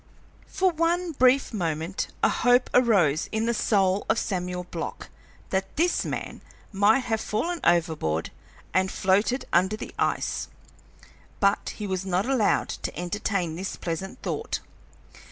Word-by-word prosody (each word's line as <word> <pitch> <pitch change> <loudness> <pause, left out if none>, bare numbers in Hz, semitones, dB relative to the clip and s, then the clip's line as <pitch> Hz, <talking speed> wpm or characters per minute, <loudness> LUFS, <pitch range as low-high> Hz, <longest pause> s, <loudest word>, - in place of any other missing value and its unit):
For 375 -1 +1
one 335 +2 0
brief 260 -2 +3
moment 165 -2 -2 0.2
a - - +6
hope 245 +1 +3
arose 195 - +3
in 220 0 0
the 235 - +1
soul 195 -3 +2
of 220 - +3
Samuel 180 -4 -2
Block - - -5 0.4
that 190 0 -2
this 345 +3 +2
man - - -5 0.3
might 210 +6 +4
have 225 -3 -1
fallen 330 +14 -2
overboard 160 - +1 0.4
and 190 0 +2
floated 205 +7 +1
under 190 +5 +3
the - - -8
ice, - - 0 0.9
but 200 0 +1
he 210 - -5
was 190 -1 -2
not 190 +1 0
allowed 255 -5 +2
to - - -5
entertain 180 -2 -2
this 190 +3 -4
pleasant 190 +7 -5
thought. - - -2
200 Hz, 135 wpm, -26 LUFS, 180-245 Hz, 0.9 s, a